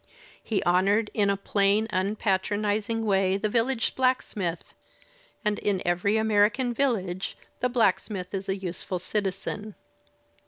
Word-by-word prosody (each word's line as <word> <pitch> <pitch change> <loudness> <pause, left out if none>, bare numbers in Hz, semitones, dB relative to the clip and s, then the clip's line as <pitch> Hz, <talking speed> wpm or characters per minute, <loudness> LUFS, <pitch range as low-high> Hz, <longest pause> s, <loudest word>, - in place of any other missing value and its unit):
He 215 - -1
honoured 200 +5 +2
in 205 -2 +2
a 200 - +1
plain 200 +2 +2
unpatronizing 205 +3 0
way 195 -2 +2
the 215 +1 -1
village 230 +2 +1
blacksmith, 215 -9 -1 0.7
and 210 0 +1
in 200 -2 0
every 180 +5 +2
American 220 +3 +2
village 195 -8 -1 0.2
the 250 - +1
blacksmith 205 -5 0
is 195 0 -4
a 190 - 0
useful 185 0 -4
citizen. 200 +2 -3
205 Hz, 120 wpm, -27 LUFS, 190-220 Hz, 0.7 s, honoured